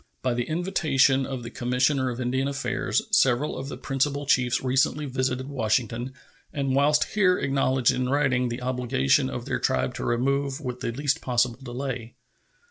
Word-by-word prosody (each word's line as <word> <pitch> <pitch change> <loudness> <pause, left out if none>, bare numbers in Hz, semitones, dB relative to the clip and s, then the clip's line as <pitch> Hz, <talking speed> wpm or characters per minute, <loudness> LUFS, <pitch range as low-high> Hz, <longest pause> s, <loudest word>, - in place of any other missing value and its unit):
By 125 -1 +1
the 120 0 -1
invitation 150 -6 +2
of 130 -3 -5
the 115 - -7
Commissioner 130 +2 +1
of 120 0 -5
Indian 130 +2 0
Affairs, 140 -1 -1
several 130 +3 +2
of 135 +1 -6
the - - -6
principal 140 +1 -1
chiefs 125 -2 +2
recently 135 +3 +1
visited 130 -1 -2
Washington, 120 -1 -1 0.4
and 135 -2 -1
whilst 145 +2 +4
here 185 -4 +3
acknowledged 135 -2 +2
in 125 0 -1
writing 130 -3 +1
the 120 +2 -5
obligation 125 - +1
of 65 - -5
their - - -2
tribe 65 0 0
to - - -4
remove 135 +3 0
with 125 -4 -5
the - - -2
least 145 +5 -1
possible 120 -1 0
delay. 125 -2 -5
130 Hz, 165 wpm, -25 LUFS, 125-140 Hz, 0.4 s, whilst